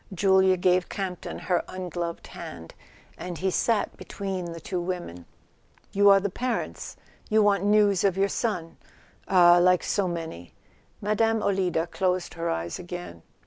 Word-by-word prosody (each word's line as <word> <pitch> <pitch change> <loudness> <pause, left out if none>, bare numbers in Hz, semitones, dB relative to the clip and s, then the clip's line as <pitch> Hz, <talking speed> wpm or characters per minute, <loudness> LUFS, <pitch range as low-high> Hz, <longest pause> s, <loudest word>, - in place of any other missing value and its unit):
Julia 190 0 +4
gave 180 0 +2
Campton 185 -3 -5
her 180 -2 0
ungloved 175 -2 -5
hand, 80 -1 -9 0.5
and 175 -2 -5
he 190 +2 0
sat 225 +3 0
between 190 -2 -5
the 165 -1 -7
two 180 +2 -3
women. 175 - -5 0.6
"You 200 0 +5
are 195 0 +7
the 200 0 -3
parents? 245 +3 -4 0.3
You 215 0 +4
want 200 -1 +2
news 205 -2 +4
of 195 -2 +2
your 195 +1 +3
son 185 -6 -3 0.5
—ah, 175 -2 +6
like 180 0 +4
so 200 -2 0
many 160 - -6 0.2
!" - - -35
Mme. 225 +2 +1
Olida 185 -4 +1
closed 180 +1 -1
her 170 0 -3
eyes 85 +1 -3
again. 175 - -8
185 Hz, 150 wpm, -26 LUFS, 175-200 Hz, 0.6 s, are